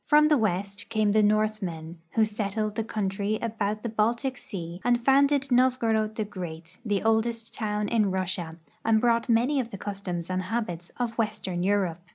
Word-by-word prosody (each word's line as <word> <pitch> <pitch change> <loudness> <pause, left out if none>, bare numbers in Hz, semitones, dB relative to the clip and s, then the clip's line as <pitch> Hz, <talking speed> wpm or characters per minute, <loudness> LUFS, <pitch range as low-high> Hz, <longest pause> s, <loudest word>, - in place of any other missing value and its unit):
From 300 0 +5
the 300 - +5
Avest 200 -1 -1
came 215 -2 +2
the 215 +1 +4
Northmen, 205 -6 0 0.2
Avho 220 - +6
settled 215 0 -2
the 225 - -1
country 205 0 -1
about 215 -2 -2
the 235 - -2
Baltic 235 +5 0
sea 175 -6 -7
and 240 0 +3
founded 280 +2 +3
NoA'gorod 230 -4 +2
the 215 - -1
Great, 175 -3 -8
tlie 205 -2 0
oldest 225 +1 +1
toAvn 210 -1 -1
in 215 -2 +2
Russia, 185 -3 -2 0.3
and 225 -1 +4
brought 235 +1 +2
many 245 +5 +3
of 240 -3 -2
the 200 - -7
customs 190 -4 -4
and 185 0 0
habits 185 -4 -3
of 240 -2 -2
western 210 -5 -1
Europe. 185 -3 +1
215 Hz, 175 wpm, -27 LUFS, 190-230 Hz, 0.3 s, Avho